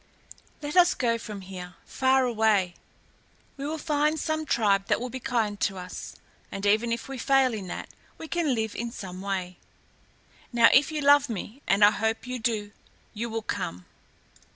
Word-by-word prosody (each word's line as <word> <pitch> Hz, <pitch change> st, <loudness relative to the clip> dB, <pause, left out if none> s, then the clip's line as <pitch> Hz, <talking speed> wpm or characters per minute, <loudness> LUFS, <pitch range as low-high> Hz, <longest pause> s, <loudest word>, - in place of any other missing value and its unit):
Let 290 Hz, +2 st, -4 dB
us 360 Hz, 0 st, +6 dB
go 230 Hz, -2 st, 0 dB
from 210 Hz, -3 st, -7 dB
here 180 Hz, -1 st, -9 dB
far 265 Hz, 0 st, +2 dB
away. 215 Hz, -6 st, +2 dB, 0.8 s
We 275 Hz, +1 st, -5 dB
will 315 Hz, +1 st, -3 dB
find 300 Hz, 0 st, +1 dB
some 315 Hz, 0 st, -2 dB
tribe 200 Hz, -4 st, +2 dB
that -, -, +2 dB
will 250 Hz, +1 st, -5 dB
be 260 Hz, -, -5 dB
kind 220 Hz, -5 st, -1 dB
to 195 Hz, -2 st, 0 dB
us, 180 Hz, 0 st, -7 dB, 0.4 s
and 195 Hz, +1 st, -4 dB
even 215 Hz, +3 st, +3 dB
if 235 Hz, 0 st, -3 dB
we 270 Hz, -1 st, -6 dB
fail 270 Hz, -1 st, +3 dB
in 200 Hz, -4 st, -5 dB
that -, -, -6 dB, 0.3 s
we 320 Hz, -, -8 dB
can 320 Hz, -6 st, 0 dB
live 220 Hz, -2 st, -2 dB
in 235 Hz, +1 st, -3 dB
some 185 Hz, -5 st, -7 dB
way. 185 Hz, -2 st, -3 dB, 0.9 s
Now, 235 Hz, -2 st, +6 dB
if 285 Hz, +3 st, +5 dB
you 305 Hz, -1 st, -2 dB
love 285 Hz, -1 st, +5 dB
me, 225 Hz, +4 st, -6 dB
and 200 Hz, +1 st, +5 dB
I 205 Hz, -, +7 dB
hope 220 Hz, +3 st, -1 dB
you 250 Hz, 0 st, -4 dB
do, 215 Hz, -3 st, -1 dB, 0.4 s
you 235 Hz, +2 st, -4 dB
will 225 Hz, 0 st, -3 dB
come." 90 Hz, -, -4 dB
230 Hz, 180 wpm, -27 LUFS, 205-270 Hz, 0.9 s, I